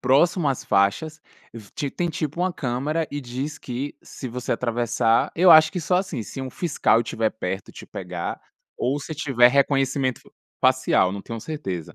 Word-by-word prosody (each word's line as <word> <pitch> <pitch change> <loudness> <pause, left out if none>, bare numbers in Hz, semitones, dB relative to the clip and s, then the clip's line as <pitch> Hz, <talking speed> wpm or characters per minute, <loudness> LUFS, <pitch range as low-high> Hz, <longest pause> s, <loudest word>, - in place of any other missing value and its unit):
próximo 145 +5 +3
às 135 - -2
faixas, 125 +11 +1 0.3
vi 110 -3 -11
ti 140 -2 -3
tem 175 -1 -2
tipo 160 +1 -3
uma 185 - +2
câmera 145 +4 -2
e 145 0 -4
diz 135 +4 -5
que 130 +3 -5
se 130 - -8
você 125 +1 -3
atravessar, 120 -1 +1
eu 180 +1 +6
acho 155 -1 +8
que 185 - -4
só 180 +3 +1
assim, 180 - -2
se 135 - -7
um 130 - -4
fiscal 145 -7 +1
estiver 110 -1 -1
perto 95 -2 -5
e - - -12
te - - -10
pegar, 90 -2 -5 0.4
ou 135 +4 0
se 155 +2 -6
tiver 135 -5 +4
reconhecimento 135 -1 +1 0.4
facial 130 -7 +3
não 100 - -5
tenho 115 +2 -7
certeza. 95 - -5
130 Hz, 180 wpm, -24 LUFS, 115-155 Hz, 0.4 s, acho